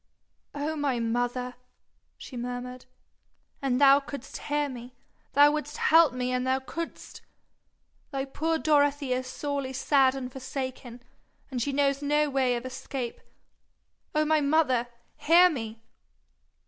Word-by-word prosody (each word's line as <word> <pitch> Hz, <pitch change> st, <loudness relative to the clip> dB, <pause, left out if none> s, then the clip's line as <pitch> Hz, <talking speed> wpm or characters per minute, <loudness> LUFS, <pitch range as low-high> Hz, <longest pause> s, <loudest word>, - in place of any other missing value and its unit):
'Oh 295 Hz, +2 st, -2 dB
my 280 Hz, -5 st, 0 dB
mother!' 245 Hz, +2 st, -1 dB, 0.6 s
she 260 Hz, -, -10 dB
murmured, 245 Hz, +1 st, -5 dB, 0.8 s
'an' 265 Hz, -3 st, +1 dB
thou 275 Hz, +1 st, +7 dB
couldst 280 Hz, -1 st, -9 dB
hear 295 Hz, 0 st, -1 dB
me, 250 Hz, -1 st, -9 dB, 0.4 s
thou 290 Hz, +1 st, +7 dB
wouldst 300 Hz, 0 st, -4 dB
help 325 Hz, -2 st, +5 dB
me 250 Hz, 0 st, -2 dB
an' 250 Hz, 0 st, 0 dB
thou 260 Hz, +1 st, +1 dB
couldst. 330 Hz, +5 st, -7 dB, 0.9 s
Thy 270 Hz, -2 st, -3 dB
poor 320 Hz, +4 st, -1 dB
Dorothy 290 Hz, -3 st, +2 dB
is 255 Hz, 0 st, -2 dB
sorely 280 Hz, 0 st, -3 dB
sad 270 Hz, 0 st, +3 dB
and 255 Hz, -2 st, -5 dB
forsaken, 260 Hz, -2 st, -6 dB, 0.5 s
and 250 Hz, -2 st, -2 dB
she 285 Hz, -, -1 dB
knows 275 Hz, 0 st, +1 dB
no 295 Hz, 0 st, +1 dB
way 260 Hz, -2 st, +2 dB
of 240 Hz, +1 st, -5 dB
escape. 255 Hz, -1 st, -5 dB, 0.9 s
Oh 305 Hz, 0 st, +3 dB
my 310 Hz, 0 st, +3 dB
mother, 280 Hz, -5 st, +2 dB, 0.3 s
hear 350 Hz, +3 st, +6 dB
me!' 225 Hz, -5 st, -6 dB
270 Hz, 135 wpm, -27 LUFS, 250-290 Hz, 0.9 s, thou